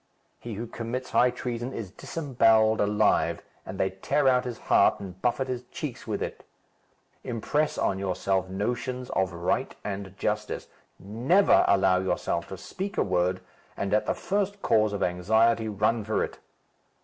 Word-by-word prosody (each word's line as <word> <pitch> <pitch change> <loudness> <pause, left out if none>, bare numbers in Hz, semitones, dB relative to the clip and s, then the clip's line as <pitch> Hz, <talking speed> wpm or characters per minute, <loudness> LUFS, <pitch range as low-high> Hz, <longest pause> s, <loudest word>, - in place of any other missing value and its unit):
He 115 -3 -6
who 115 +4 -4
commits 120 +2 -5
high 125 - +5
treason 120 +1 -4
is 100 -5 -6
disembowelled 115 -7 +2
alive, 105 +1 +2 0.2
and 95 - -6
they 95 - +1
tear 135 +9 0
out 125 -1 +4
his 120 -2 -4
heart - - +3
and 95 -2 -9
buffet 125 +2 0
his 125 -1 -3
cheeks 125 -2 -7
with - - -2
it. - - -6 0.8
Impress 145 +6 -1
on 95 - 0
yourself 95 0 -1
notions 125 +6 -3
of 95 -1 0
right 85 +1 -1
and 95 -1 -5
justice. 105 +1 -2 0.3
Never 125 - +3
allow 95 -1 +4
yourself 85 -2 -1
to 95 - -7
speak 190 - -6
a - - +3
word, 90 0 0 0.4
and 100 +1 -2
at 105 - +2
the - - +1
first 200 0 -2
cause 110 -1 +3
of 100 - -2
anxiety, 110 +6 +2
run 110 +2 +1
for 110 +1 0
it. - - -6
110 Hz, 160 wpm, -27 LUFS, 95-125 Hz, 0.8 s, high